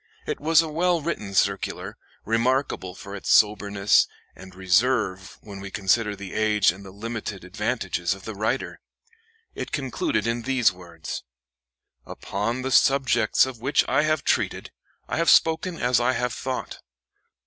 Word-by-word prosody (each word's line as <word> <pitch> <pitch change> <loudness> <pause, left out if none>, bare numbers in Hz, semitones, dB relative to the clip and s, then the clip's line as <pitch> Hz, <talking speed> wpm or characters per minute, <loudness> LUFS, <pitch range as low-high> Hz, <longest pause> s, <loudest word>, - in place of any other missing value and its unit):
It - - -3
was 160 +1 +4
a - - -4
well 170 +3 +1
written 110 -11 -4
circular, - - 0 0.3
remarkable 115 -4 0
for 100 0 -9
its 100 - -6
soberness 105 -1 +4 0.3
and, 95 0 -13
reserve 95 +1 +1
when 100 -2 -10
we 100 0 -7
consider 105 +1 +1
the 95 -2 -9
age 105 -4 +3
and 95 +3 -12
the 95 - -10
limited 105 -1 -6
advantages 90 0 -2
of 95 - -14
the 110 - -5
writer. 110 +6 -2 0.7
It - - -6
concluded 125 -5 -1
in 115 +1 -1
these 125 -2 +2
words: 85 -3 -8 0.8
"Upon 115 +6 -4
the 130 - -2
subjects 130 -4 +4
of 130 -4 -8
which 135 +4 +2
I - - +3
have 155 0 0
treated, - - -1 0.4
I - - -3
have 165 +1 +2
spoken 165 +2 +3
as 125 -1 +2
I 125 +2 +2
have 125 0 -1
thought. 130 -1 -5
110 Hz, 150 wpm, -24 LUFS, 100-130 Hz, 0.8 s, was